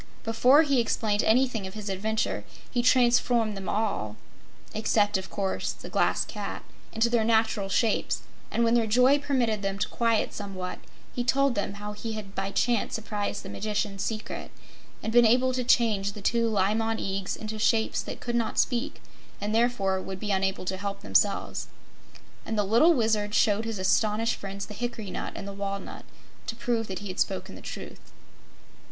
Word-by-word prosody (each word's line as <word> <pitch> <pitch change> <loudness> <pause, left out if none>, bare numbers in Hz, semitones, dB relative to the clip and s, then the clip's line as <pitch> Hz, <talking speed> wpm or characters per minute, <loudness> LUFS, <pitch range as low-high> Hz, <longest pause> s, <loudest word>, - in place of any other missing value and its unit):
Before 250 +7 +5
he 280 -4 +2
explained 215 -2 +1
anything 230 -3 +2
of 190 - -10
his 210 -1 -6
adventure, 215 +3 -1 0.3
he 245 - +1
transformed 240 -3 +3
them 195 -1 -5
all 200 - -1 0.6
except, 210 -1 +2
of 190 0 -2
course, 195 -1 -2
the - - -10
Glass - - +2
Cat - - -6 0.3
into 225 +1 +2
their 235 -1 +2
natural 220 -3 +2
shapes, 220 +2 +1 0.3
and 235 - +1
when 230 0 +3
their 235 -2 +3
joy 250 +6 +5
permitted 250 -7 0
them 195 -1 -2
to 195 - 0
quiet 230 -2 +1
somewhat, 190 -3 -5 0.3
he 245 - -1
told 275 +1 +2
how 205 +1 -3
he 220 +2 -5
had 205 -3 -7
by 195 0 -2
chance 235 +2 +1
surprised 210 -2 -3
the - - -8
Magician's 210 -2 -2
secret 220 -1 -4 0.5
and 220 - -2
been 240 0 +7
able 250 +3 +4
to 255 0 -1
change 215 -5 +2
the 210 - -9
two 230 +1 +2
Li 200 -1 +2
Mon 225 0 0
Eags 195 -2 -2
into 215 0 -5
shapes 220 +1 +2
that - - -7
could 240 - -4
not 230 -2 -1
speak, 265 +4 0 0.4
and 210 +1 -2
therefore 220 -5 +2
would 190 0 -6
be 210 0 -2
unable 190 -1 0
to 190 +1 -2
help 200 0 -4
themselves. 205 0 +1 0.8
And 220 - -3
the 210 - +3
little 235 - +5
Wizard 215 -3 +1
showed 215 0 +3
his 225 -2 -3
astonished 215 +4 +2
friends 195 0 -6
the 210 - -9
hickory 220 -3 -4
nut - - -4
and 200 - -6
the 200 - -5
walnut 200 0 -5 0.4
to 225 - -3
prove 230 -1 -1
that 190 - -4
he - - -5
had 185 - -6
spoken - - -1
the - - -10
truth. - - -9
220 Hz, 180 wpm, -27 LUFS, 200-235 Hz, 0.8 s, been